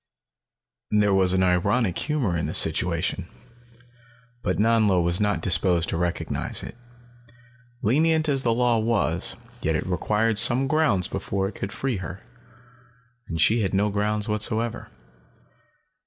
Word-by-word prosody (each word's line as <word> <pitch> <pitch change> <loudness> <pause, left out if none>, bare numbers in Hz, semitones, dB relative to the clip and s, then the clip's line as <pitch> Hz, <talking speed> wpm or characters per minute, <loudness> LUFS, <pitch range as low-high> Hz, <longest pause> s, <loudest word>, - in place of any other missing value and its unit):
There 105 -1 +2
was 95 -1 +3
an 95 0 +2
ironic 95 +3 +1
humor 140 - -1
in 85 - -2
the - - -5
situation, - - +1 1.1
but - - -1
Nanlo 110 -3 +3
was 85 +1 0
not 105 -1 0
disposed 90 -2 +1
to - - -2
recognize 85 0 -3
it. - - -9 1.1
Lenient 155 +7 +2
as 140 -2 0
the 120 - 0
law 120 0 +2
was, 100 -6 -1 0.3
yet 80 0 0
it - - -2
required 105 +4 +1
some 130 +2 +4
grounds 135 - +1
before 95 0 -3
it 100 - -7
could 95 - -6
free 135 -5 -3
her. 95 +1 -7 1.1
And 85 -2 -5
she 110 +8 +3
had 95 -1 -1
no 105 +2 +1
grounds 105 +1 -1
whatever. 110 +2 -1
105 Hz, 140 wpm, -24 LUFS, 95-115 Hz, 1.1 s, some